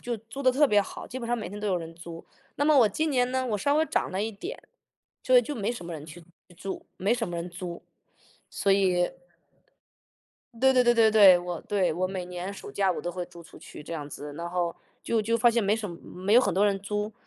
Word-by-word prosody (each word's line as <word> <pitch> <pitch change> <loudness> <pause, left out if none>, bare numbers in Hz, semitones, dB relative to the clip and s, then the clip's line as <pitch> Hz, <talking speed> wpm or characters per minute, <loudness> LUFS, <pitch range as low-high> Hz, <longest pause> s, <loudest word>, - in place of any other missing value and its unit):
就 240 -1 -3
租 225 +5 -10
得 260 -2 +4
特 290 +2 +4
别 210 -3 +5
好， 200 - -7
基 255 - -6
本 235 - -6
上 240 +1 0
每 220 - -5
天 205 - -8
都 210 - -4
有 190 -3 +1
人 165 -1 -6
租， 170 -1 -10 0.3
那 290 - 0
么 300 -1 +5
我 230 -4 +6
今 310 +10 -1
年 250 -2 +2
呢， 260 0 0
我 220 -5 -1
稍 285 +8 +1
微 315 +1 +3
涨 - - -1
了 195 +2 -1
一 225 - -2
点， 345 - -7 0.7
所 255 - +5
以 245 - +7
就 270 - -5
没 225 +2 -1
什 180 -7 -8
么 170 - -6
人 155 -2 -8
去 160 +2 -11
去 175 +1 -24
住， 195 +2 -6
没 200 +5 +1
什 240 -4 -1
么 175 - -5
人 170 +1 -5
租。 175 0 -7 0.7
所 200 - 0
以， 180 -2 +2 1.5
对 265 0 +5
对 250 - +5
对 240 - +5
对 225 -1 +5
对， 195 -4 +8
我 175 -1 -5
对， 195 -5 0
我 185 +3 -1
每 185 -1 -5
年 180 +2 -5
暑 200 - -9
假 195 -2 +1
我 - - -4
都 175 - -3
会 180 0 -4
租 170 -1 -13
出 - - -15
去 - - -11
这 170 - -7
样 150 -3 -5
子， 145 0 -8
然 170 +1 -5
后 175 -1 -1 0.3
就 225 -2 +1
就 230 +2 0
发 240 +1 +5
现 230 -1 +1
没 200 +2 +2
什 220 -2 -4
么 170 - -8
没 190 +3 -2
有 245 - +8
很 200 - +1
多 195 +3 +3
人 200 -1 +1
租。 210 +2 -3
200 Hz, 280 characters per minute, -27 LUFS, 175-235 Hz, 1.5 s, 对